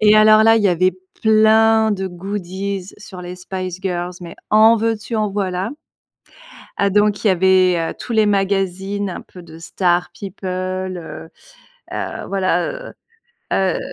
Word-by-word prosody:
et 215 0 +5
alors, 215 0 +6
là, 225 +1 +5
il 220 - +1
y 200 - +4
avait 185 +1 +2 0.3
plein 220 0 +4
de 190 -1 -3
goodies 190 +1 -5
sur 190 -3 -10
les 180 +1 -7
Spice 185 0 -6
Girls 180 -2 -3
mais 170 -1 -9
en 220 +2 +6
veux-tu 225 0 -2
en 215 -1 0
voilà. 190 -2 -2 1.1
Ah, 200 0 +1
donc, 210 +1 +1
il - - +4
y - - +5
avait, 185 0 +3
heu, 165 - -3
tous 240 - -6
les 220 -1 +3
magazines 195 0 -1
un - - -6
peu 180 - -14
de 160 -1 -13
stars 175 +1 0
people, 195 -1 -7 0.5
heu 160 -1 -9 0.6
heu, - - -4
voilà, 195 - 0 0.2
heu - - -11 0.6
heu. 190 -2 +1
195 Hz, 160 wpm, -19 LUFS, 180-215 Hz, 1.1 s, alors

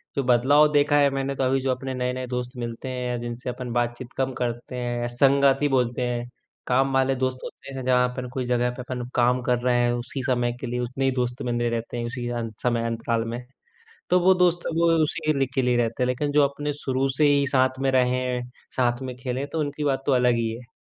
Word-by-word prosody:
जो 140 - 0
बदलाव 130 +5 +5
देखा 145 0 +4
है 145 -1 +5
मैंने 135 0 -2
तो 135 - -1
अभी 130 +1 +2
जो 130 0 0
अपने 130 +1 -3
नए-नए 125 0 -2
दोस्त 125 +1 -4
मिलते 120 +2 -5
हैं 125 -1 -3
या 120 - -1
जिनसे 120 +1 -5
अपन 125 -1 -5
बातचीत 120 +1 -2
कम 130 0 0
करते 120 +1 -3
हैं, 120 -1 -2
संगती 140 +3 +3
बोलते 125 0 0
हैं। 120 0 -3 0.4
काम 135 +2 +2
वाले 135 0 +2
दोस्त 130 0 -1
होते 135 - -9
हैं 130 -1 -5
जहाँ 125 -1 +4
पर 125 0 -3
कोई 130 -2 -2
जगह 125 0 +1
पे 125 - -7
अपन 125 -1 -5
काम 125 +1 +3
कर 125 -1 +1
रहे 125 0 +2
हैं 120 - +2
उसी 120 +2 -4
समय 120 -2 +1
के 130 - -3
लिए 125 +1 -2
उतने 125 +2 -2
ही 135 - +3
दोस्त 125 0 -2
बने 120 -1 -1
रहे 120 - +1
रहते 115 +1 -6
हैं 120 - -2
उसी 120 0 -4
अं 120 -2 -3
समय 120 -2 +1
अंतकाल 115 0 -1
में। 120 - -4 0.7
तो 180 - +5
वो 185 +2 +5
दोस्त 175 -1 +3 0.2
वो 170 +1 +3 0.2
उसी 155 0 0
लि 135 - +3
के 135 - +2
लिए 125 -1 +2
रहते 115 +1 0
हैं। - - +1
लेकिन 145 +3 -1
जो 145 0 +5
अपने 145 +1 -4
शुरू 135 -2 -1
से 150 - +4
ही 140 -1 +3
साथ 130 -1 +2
में 135 - +2
रहे, 125 -1 +1 0.4
साथ 120 0 +1
में 130 -2 -5
खेले 125 +2 -3
तो 160 - -1
उनकी 145 0 -2
बात 135 -2 0
तो - - +2
अलग 125 -1 +4
ही 115 -1 0
है। 120 0 -12
125 Hz, 240 wpm, -25 LUFS, 120-135 Hz, 0.7 s, बदलाव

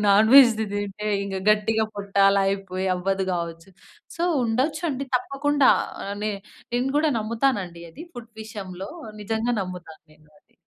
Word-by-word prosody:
నాన్‌వెజ్‌ది 220 +1 +6
తింటే 205 +1 -3 0.2
ఇక 195 -1 -5 0.2
గట్టిగా 220 +1 +2
పొట్ట 200 0 -8 0.2
అలా 195 0 +3
అయిపోయి 190 -1 -3
అవ్వదు 190 +1 -1
కావచ్చు. 170 +1 -5 0.5
సో, 335 - -3 0.2
ఉండొచ్చు 270 +8 0
అండి. 275 -1 -3
తప్పకుండా 275 +2 +2 0.5
నె 215 - 0 0.4
నేను 245 +2 0
కూడా 310 +1 +3
నమ్ముతానండి 215 -6 -1
అది 315 - -10
ఫుడ్ 235 -1 -10
విషయంలో. 195 -3 -7 0.3
నిజంగా 225 +3 -1
నమ్ముతాను 180 -3 -9
నేను 155 0 -24
అది. - - -37
215 Hz, 135 wpm, -24 LUFS, 195-245 Hz, 0.5 s, నాన్‌వెజ్‌ది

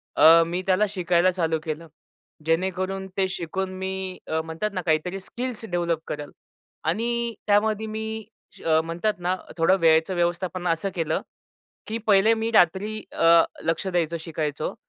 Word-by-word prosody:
अ, 165 +1 +8
मी 175 +2 -2
त्याला 190 +3 +4
शिकायला 180 -2 +2
चालू 165 -3 0
केलं. 160 +1 -5 0.6
जेणेकरून 185 +3 -1
ते 190 -1 +2
शिकून 185 +2 -3
मी 190 -1 -4
अ, 160 0 0
म्हणतात 165 +6 -3
ना 185 - -2
काहीतरी 175 +4 0
स्किल्स 240 +3 -5
डेव्हलप 170 -4 -1
करेल 150 -1 -5 0.5
आणि 235 +6 0
त्यामध्ये 215 +1 +2
मी 220 0 -4 0.3
श - - -16 0.2
म्हणतात 175 +6 -1
ना 180 +1 0 0.2
थोडं 165 +4 +4
वेळेचं 160 +3 +4
व्यवस्थापन 175 +1 -1
असं 165 +4 0
केलं, 165 -3 -1 0.7
की 225 +1 -3
पहिले 210 +2 +5
मी 225 +1 -2
रात्री 210 +4 +3
अ, 165 0 +6 0.2
लक्षं 180 +3 -1
द्यायचं 170 -1 0
शिकायचो. 155 -2 -3
185 Hz, 145 wpm, -25 LUFS, 165-205 Hz, 0.7 s, अ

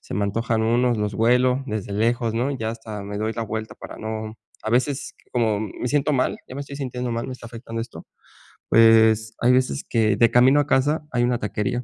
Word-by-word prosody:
se - - -8
me 100 +1 0
antojan 110 +2 -1
unos 120 +1 +2
los 105 -1 -2
huelo, 125 +4 +3
desde 105 -3 -4
lejos, 115 +2 0
¿no?, 125 +4 0
ya 110 -4 -3
hasta 110 -3 -7
me 100 +1 -5
doy 110 +1 -1
la 115 - -3
vuelta 110 0 -5
para - - -10
no 110 0 -5 0.3
a 110 - -2
veces 130 +3 0 0.2
como 110 -4 +1
me 110 +3 -5
siento 145 +2 +1
mal, 130 -2 +1
ya - - -9
me - - -4
estoy 140 0 -9
sintiendo 125 -3 -4
mal, 115 0 -3
me - - -4
está 125 -2 -10
afectando 115 -1 -7
esto. 115 0 -8 0.6
Pues, 110 -1 +5
hay 120 - +4
veces 125 - +1
que 110 -3 +2
de 115 +2 +4
camino 130 +4 +5
a 145 - -4
casa 150 +3 +1
hay 120 -1 +1
una 120 0 +1
taquería, 105 +4 -2
115 Hz, 220 wpm, -23 LUFS, 110-125 Hz, 0.6 s, Pues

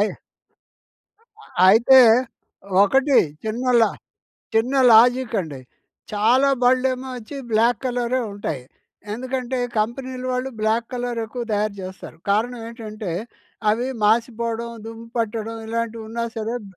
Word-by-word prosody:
అయ్ 210 - +1 1.3
అ - - -16 0.2
అయితే, 240 +6 +7 0.8
ఒకటి 270 +6 +3 0.3
చిన్న 230 +4 -3 0.2
లా - - +4 0.7
చిన్న 240 +5 +2 0.2
లాజికండి. 225 - +3 0.5
చాలా 245 +7 +3
బళ్ళేమో 255 +1 +2
వచ్చి 245 +5 -9
బ్లాక్ 225 +1 +3
కలరే 245 0 0
ఉంటాయి. 160 -10 -5 0.5
ఎందుకంటే, 255 +2 -3 0.2
కంపెనీలు 255 +3 -3
వాళ్ళు 255 +1 -2
బ్లాక్ 225 +2 +1
కలర్ 245 -1 -3
ఎక్కువ 240 +2 -5
తయారు 210 0 -1
జేస్తారు. 185 -3 -9
కారణం 230 +4 +1
ఏంటంటే 215 -5 -7 0.6
అవి 240 +4 -1 0.2
మాసిపోవడం, 230 +1 0 0.2
దుమ్ము 225 0 -9
పట్టడం 225 0 -2
ఇలాంటివి 230 0 -3
ఉన్నా 235 +1 -3
సరే 225 +2 -2
ఉ - - -13
230 Hz, 115 wpm, -22 LUFS, 220-250 Hz, 1.3 s, అయితే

